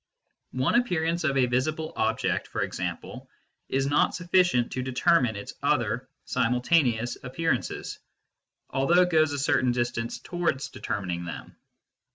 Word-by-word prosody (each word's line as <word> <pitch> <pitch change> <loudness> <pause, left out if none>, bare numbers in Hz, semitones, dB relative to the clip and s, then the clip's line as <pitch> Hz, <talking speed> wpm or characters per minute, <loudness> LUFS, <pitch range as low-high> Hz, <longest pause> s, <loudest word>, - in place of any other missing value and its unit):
One 130 +1 +1
appearance, 170 -8 +1
of 140 -3 +1
a 130 - +4
visible 155 +6 -1
object - - 0
for - - -2
example, - - -5 0.4
is 135 0 +1
not 145 +1 +2
sufficient 175 -8 +2
to 130 - -2
determine 130 -1 +2
its 100 - -7
other - - 0 0.2
simultaneous 125 -1 +1
appearances, 165 +6 -2 0.7
although 170 +7 +4
it 180 - -1
goes 155 -2 +4
a 145 - -2
certain 130 -2 +2
distance 120 -1 -2
towards 160 -6 -2
determining 90 -7 -4
them. 85 - -8
135 Hz, 130 wpm, -27 LUFS, 125-165 Hz, 0.7 s, a